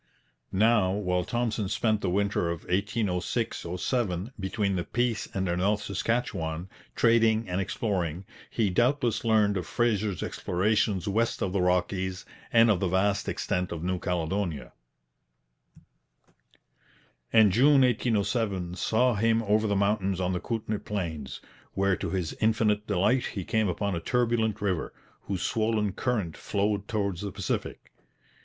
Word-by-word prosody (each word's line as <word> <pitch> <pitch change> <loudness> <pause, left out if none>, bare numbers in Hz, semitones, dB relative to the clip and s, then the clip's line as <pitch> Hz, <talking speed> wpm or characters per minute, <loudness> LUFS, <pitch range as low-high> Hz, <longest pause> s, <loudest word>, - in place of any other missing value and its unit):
Now, 105 -2 +3
while 90 -3 0
Thompson 115 -2 -1
spent 110 -1 +1
the 95 - 0
winter 100 -2 0
of 85 -2 -3
1806 100 +1 -1
7 100 -1 -1
between 100 +1 -1
the 90 - -1
Peace 120 +1 -1
and 95 -1 -2
the 85 - 0
North 100 +3 +1
Saskatchewan, 90 -5 -2 0.3
trading 115 -1 +3
and 90 +1 -1
exploring, 95 -4 -2 0.2
he 105 -4 0
doubtless 120 +2 +1
learned 105 -3 +3
of 90 -3 -4
Fraser's 105 -2 0
explorations 100 0 0
west 110 +3 0
of 95 - -2
the 100 - +1
Rockies 90 +1 0 0.3
and 115 -1 +6
of 95 - +1
the 95 - 0
vast 95 +3 +1
extent 90 -2 -2
of 80 -1 -5
New 90 0 -1
Caledonia; 90 -1 -2 2.6
and 110 -3 +6
June 135 +7 +5
1807 110 -6 0
saw 125 +5 +2
him 115 +2 +2
over 110 +1 +2
the 100 - +1
mountains 100 -2 +1
on 90 0 0
the 90 - -1
Kootenay 110 -1 -3
plains, 80 -9 -5 0.3
where 100 -1 +2
to - - -4
his 90 -4 -2
infinite 110 -1 +2
delight 105 +6 +2
he 95 -4 -5
came 110 -1 +1
upon 100 +2 -1
a 85 - -1
turbulent 115 0 0
river, 95 -5 -2 0.3
whose 95 -2 -3
swollen 110 -2 0
current 105 -8 -1
flowed 100 0 -1
towards 100 -5 -2
the 100 -1 -4
Pacific. - - -4
100 Hz, 140 wpm, -28 LUFS, 90-110 Hz, 2.6 s, and